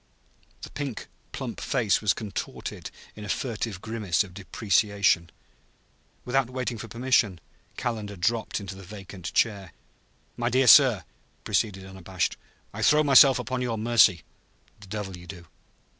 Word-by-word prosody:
The - - -8
pink 140 -5 -5 0.3
plump - - -6
face 110 -6 +1
was 105 -3 +2
contorted 105 -4 -6 0.3
in 105 - -9
a 105 - -7
furtive 110 -5 -3
grimace 105 -6 0
of 95 -3 -13
deprecation. 100 -1 +1 1.0
Without 125 0 +1
waiting 125 -3 -4
for 115 - -7
permission 115 -5 +1 0.4
Calendar 110 -5 -4
dropped 110 +7 -1
into 100 -1 -7
the 95 - -12
vacant 95 -2 -9
chair. 100 -6 0 0.6
"My 120 0 0
dear 130 +2 +2
sir," 125 -7 +7
he - - -38
proceeded, 95 -3 -1
unabashed, 95 -1 -3 0.4
"I - - -6
throw 150 0 +4
myself 135 -2 +7
upon 130 -1 -3
your 120 -3 -2
mercy." 110 -6 +4 0.6
"The 100 - -14
devil 95 -2 -5
you 90 0 -13
do!" 90 -1 -10
105 Hz, 145 wpm, -26 LUFS, 95-120 Hz, 1.0 s, sir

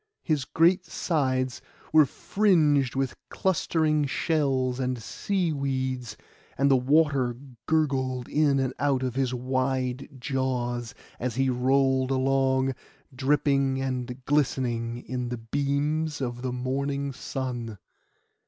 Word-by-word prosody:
His 150 -5 0
great 175 +5 +3
sides 130 -6 -1 0.3
were 155 -2 +7
fringed 150 - +2
with 135 -1 0 0.2
clustering 160 -5 +1
shells 135 -4 0
and 125 -1 -1
sea 175 - -1
weeds, 130 -5 -2 0.4
and 140 +1 +3
the - - +7
water 135 -2 +2 0.3
gurgled 130 -5 0
in 145 -2 +2
and 130 -1 0
out 140 -2 +1
of 130 -2 -1
his 130 -1 0
wide 130 +1 -1
jaws, 125 -3 -2 0.2
as 120 -1 -2
he 135 0 +2
rolled 130 +1 +2
along, 135 0 +2 0.4
dripping 135 0 +1
and 130 -1 -4
glistening 125 -5 0
in 125 -1 -3
the 125 - -3
beams 145 +5 -1
of 120 -2 -3
the 130 0 -2
morning 140 +3 -2
sun. 120 -4 -4
135 Hz, 115 wpm, -27 LUFS, 125-145 Hz, 0.4 s, were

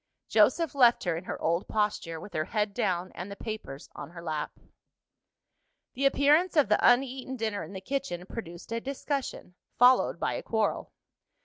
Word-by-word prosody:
Joseph 330 -5 +3
left 245 -4 +5
her 175 -3 0
in 170 +3 -6
her - - -5
old 170 +3 0
posture, 210 -6 -1
with 205 - -11
her 155 0 -1
head 210 +1 -1
down 185 -5 -1
and 180 +3 -7
the 200 - -7
papers 205 -12 -7
on 140 - -8
her 170 0 -10
lap. 155 -2 -4 1.3
The 275 +2 +2
appearance 300 +6 +3
of 285 -9 +5
the 210 - +4
uneaten 260 +1 +2
dinner 220 -4 -2
in - - -8
the 190 - -6
kitchen 225 -7 -3
produced 175 -3 -8
a 230 0 -2
discussion, 275 -6 -4 0.2
followed 250 +1 +5
by - - 0
a - - -3
quarrel. 220 -2 -1
215 Hz, 175 wpm, -29 LUFS, 175-260 Hz, 1.3 s, left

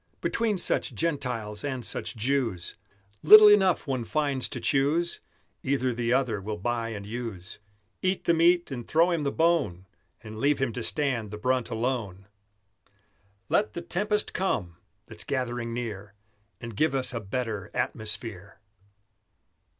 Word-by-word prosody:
Between 225 -3 0
such - - +1
Gentiles 125 -10 -2
and 130 -4 -3
such - - -1
Jews 115 -6 -1 0.5
Little 210 +6 +10
enough 190 -4 +4
one 130 -4 -2
finds 140 0 -1
to - - -5
choose: 155 +5 +1 0.4
Either 130 -2 0
the 115 0 -1
other 125 -6 +1
will 105 +2 -4
buy 115 +2 -2
and 105 -3 -6
use, 110 -4 -6 0.4
Eat 185 0 0
the 170 - +3
meat 170 0 +3
and 120 -3 -4
throw 165 +7 +3
him 170 -2 0
the 140 -1 -1
bone, 145 - +1 0.4
And 110 0 -8
leave 145 +3 +2
him 130 -4 -1
to - - -4
stand 115 +3 0
the 105 - -7
brunt 125 +2 0
alone. 115 -5 -3 1.2
Let 210 - +1
the 170 - -5
tempest 210 +5 0
come, 90 - -2 0.3
that's - - -6
gathering 120 -3 -3
near, 105 -4 -6 0.4
And 115 -2 -8
give 150 +4 +1
us 130 -2 -1
a 115 - -2
better 110 -1 -4
atmosphere! 105 -3 -3
125 Hz, 145 wpm, -27 LUFS, 110-150 Hz, 1.2 s, Little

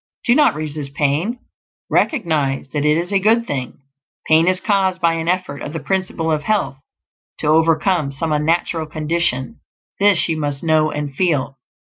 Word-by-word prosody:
Do 240 - +5
not 295 - +4
resist 150 -2 -5
pain; 150 - 0 0.5
recognize 155 - 0
that 145 +1 -1
it 150 +1 +3
is 175 +4 -3
a 195 - +4
good 225 +4 +3
thing. 130 - -5 0.4
Pain 160 +2 +4
is 185 0 +2
caused 190 -3 +1
by 170 -2 +2
an 165 0 -3
effort 180 -5 -1
of 145 - -6
the 165 - -3
Principle 165 +1 -2
of 155 -1 0
Health 205 -8 -1 0.6
to - - -6
overcome 160 0 +2
some 155 +4 -3
unnatural 160 +1 0
condition; 155 - -2 0.4
this 200 -3 +3
you 165 -2 -1
must 145 -2 -3
know 155 -1 +3
and 150 -2 -4
feel. 140 -5 0
160 Hz, 165 wpm, -19 LUFS, 145-185 Hz, 0.6 s, Do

